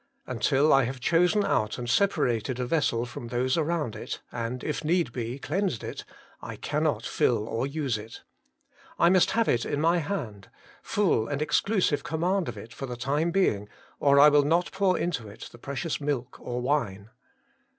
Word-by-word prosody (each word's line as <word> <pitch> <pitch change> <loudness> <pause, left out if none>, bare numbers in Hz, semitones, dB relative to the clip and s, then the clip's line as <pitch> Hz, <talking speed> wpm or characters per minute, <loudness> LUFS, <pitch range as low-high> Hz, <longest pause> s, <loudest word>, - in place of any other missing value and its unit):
Until 145 +3 +2
I 135 -2 +5
have 130 +2 -5
chosen 180 - +3
out 105 0 0
and 120 - -5
separated 125 - +1
a 125 - -1
vessel 125 -5 +1
from 120 -1 -8
those 125 +2 0
around 160 -6 -1
it, - - -6
and, 120 +1 -4
if 150 +1 -3
need 170 +2 +1
be, 120 +1 -4
cleansed 170 - -2
it, - - -6 0.4
I - - -7
cannot 150 -7 -1
fill 110 -3 +1
or 115 +4 -2
use 140 -6 -2
it. 110 +2 -11 0.7
I 170 - +5
must 185 -2 +4
have 230 - +3
it 120 - +2
in 145 - -2
my 165 +3 +3
hand, 120 - -5 0.3
full 185 - +1
and 145 -1 -2
exclusive 155 +1 +1
command 175 +2 0
of 115 - -7
it 110 +4 -10
for 135 - -6
the 125 -1 -6
time 145 +7 0
being, 110 - +1 0.3
or 140 0 +5
I 150 +1 +9
will 145 0 +5
not 165 +5 +1
pour 190 -1 +2
into 150 -11 -2
it 100 - -10
the 120 - -14
precious 140 +5 -4
milk 140 -4 -3
or 125 0 -4
wine. 115 -7 -1
140 Hz, 180 wpm, -27 LUFS, 120-165 Hz, 0.7 s, I